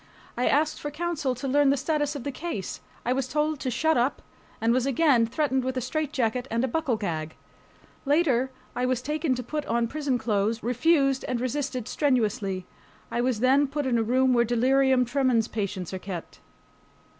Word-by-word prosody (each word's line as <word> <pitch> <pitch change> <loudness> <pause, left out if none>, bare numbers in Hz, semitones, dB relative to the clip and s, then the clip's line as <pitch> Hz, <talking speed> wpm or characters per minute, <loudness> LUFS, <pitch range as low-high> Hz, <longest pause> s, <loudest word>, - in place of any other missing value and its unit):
I 245 - 0
asked 305 +2 +2
for 295 - -3
counsel 300 -4 -2
to 250 +3 -5
learn 285 +1 +4
the 280 - +3
status 295 +1 -1
of 280 - -5
the 280 - -3
case. 260 - -5 0.2
I 245 - +2
was 265 -1 -1
told 300 +1 0
to 260 - -2
"shut 315 +7 +2
up," 245 +4 0 0.4
and 230 +1 +2
was 255 +1 +1
again 270 -4 +3
threatened 265 0 0
with 260 0 -2
a - - +2
straitjacket 255 -3 -1
and 230 +2 0
a - - +2
buckle 270 -3 0
gag. 160 -6 -4 0.7
Later 275 -4 +2 0.3
I 250 - -1
was 255 -1 +1
taken 300 -1 0
to 250 - -4
put 300 +5 -3
on 235 0 +1
prison 285 -1 -1
clothes, 220 0 0
refused 275 +2 +2
and 250 -2 -1
resisted 255 -1 -2
strenuously. 210 -9 0 0.5
I 235 +1 0
was 245 -3 0
then 270 +3 +4
put 285 +1 -3
in 240 -3 +2
a - - +2
room 255 +3 +3
where 235 -1 +4
delirium 255 +2 +3
tremens 245 -3 +1
patients 195 -4 -4
are 190 - -3
kept. 180 -3 -7
255 Hz, 190 wpm, -26 LUFS, 235-285 Hz, 0.7 s, learn